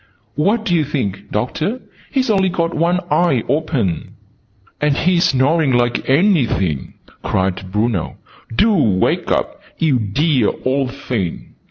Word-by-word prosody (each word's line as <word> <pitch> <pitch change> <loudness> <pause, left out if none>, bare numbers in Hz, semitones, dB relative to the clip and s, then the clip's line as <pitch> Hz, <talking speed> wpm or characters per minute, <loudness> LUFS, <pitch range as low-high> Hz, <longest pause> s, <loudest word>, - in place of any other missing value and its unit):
"What 210 +9 +1
do 180 - 0
you 165 -3 +3
think, 105 -10 -3
Doctor? 155 - -2 0.3
He's 260 -4 +1
only 190 -2 +2
got 170 -2 -1
one 170 +3 +1
eye 135 -10 +2
open!" 140 - -1 0.7
"And 150 -1 +2
he's 180 +1 +2
snoring 145 +1 +2
like 120 +1 0
anything!" 130 - +1 0.3
cried 95 0 -2
Bruno. 105 -3 -1 0.4
"Do 215 - +4
wake 105 - +1
up, - - -1 0.2
you 145 -6 +2
dear 125 +3 +1
old 130 0 0
thing!" 120 - -4
140 Hz, 130 wpm, -18 LUFS, 110-170 Hz, 0.7 s, Do